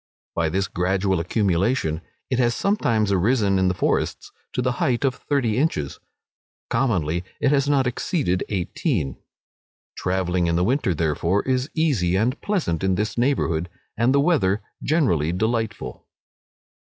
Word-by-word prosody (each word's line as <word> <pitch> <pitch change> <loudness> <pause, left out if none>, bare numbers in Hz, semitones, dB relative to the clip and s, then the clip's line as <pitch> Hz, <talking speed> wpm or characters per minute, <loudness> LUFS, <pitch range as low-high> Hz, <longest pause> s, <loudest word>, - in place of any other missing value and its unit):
By 80 -2 0
this 95 +3 0
gradual 95 +1 0
accumulation, 90 -1 0 0.3
it 130 - +1
has 120 -1 +2
sometimes 115 - +1
arisen 100 0 +2
in 95 - +3
the 90 - +1
forests - - -1 0.2
to - - -2
the 125 - +1
height 125 +1 +1
of 130 - +2
thirty 125 -5 -1
inches; 75 - -1 0.7
commonly 90 - +1 0.2
it 135 - +2
has 140 -1 +2
not 140 -2 +3
exceeded 125 - 0
eighteen. 95 - -1 0.8
Travelling 90 -1 0
in 85 - +1
the 90 - +2
winter, 110 - +1
therefore, 85 +5 0
is 130 +2 0
easy 125 - +2
and 120 +8 0
pleasant 160 - -1
in 95 -1 +2
this 105 +3 -2
neighbourhood, 90 - 0 0.3
and 115 +3 +2
the 140 - +4
weather 125 - +2 0.2
generally 105 - +2
delightful. 110 - -2
105 Hz, 140 wpm, -23 LUFS, 90-130 Hz, 0.8 s, the